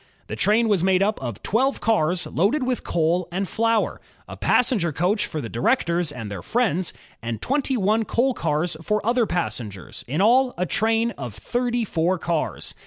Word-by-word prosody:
The - - -5
train 225 +2 +3
was 200 -5 +2
made 190 0 +3
up 210 -4 -1
of 120 -6 -6
twelve 265 +6 +1
cars 180 -5 +1
loaded 220 - +1
with 250 -1 -1
coal 170 +2 0
and 190 +2 -2
flour, 225 +1 0 0.3
a - - -8
passenger 210 -9 +2
coach 185 +8 0
for 155 - -4
the 115 - -5
directors 170 - 0
and 115 -7 -7
their 100 -4 -5
friends, 185 - 0 0.3
and 115 -1 -4
twenty 270 - 0
one 215 +2 +2
coal 255 +5 +1
cars 155 -4 -1
for 210 +5 -1
other 235 -1 +2
passengers, 105 - -4
in 140 +6 -2
all 245 +5 +4
a 180 - 0
train 225 +4 +1
of 120 -7 -6
thirty 245 -1 -1
four 180 0 0
cars. 165 -1 -2
190 Hz, 175 wpm, -23 LUFS, 160-230 Hz, 0.3 s, all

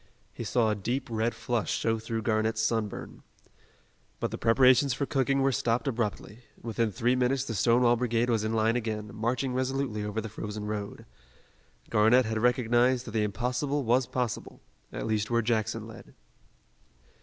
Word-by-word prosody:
He - - -6
saw 115 -3 +1
a - - 0
deep 120 +7 -3
red 110 +1 0
flush 115 -1 -2
show 115 0 0
through 115 0 -4
Garnett's 110 +1 0
sunburn. 110 -2 -2 1.0
But - - -2
the - - -4
preparations 125 +2 +4
for 140 - -1
cooking 135 0 +1
were 135 - +3
stopped 115 -1 0
abruptly. 115 -3 -3 0.2
Within 115 -1 -1
three 120 +6 +1
minutes 125 +1 +1
the 115 - -4
Stonewall 120 +2 +4
Brigade 120 0 0
was 115 -3 +1
in 110 - -1
line 110 +1 +2
again, 110 -3 -3
marching 120 +4 -1
resolutely 130 -4 -1
over 105 +1 -3
the 110 - -4
frozen 105 0 -6
road. 105 -1 -5 0.9
Garnett 115 +4 +5
had 110 0 -2
recognized 125 +1 +2
that 110 - -7
the 110 0 0
impossible 125 +7 -1
was 120 +1 +2
possible 125 -4 -3 0.3
at - - -5
least 105 -1 -1
where 115 -1 +1
Jackson 110 -2 -1
led. - - -13
115 Hz, 165 wpm, -28 LUFS, 110-125 Hz, 1.0 s, Garnett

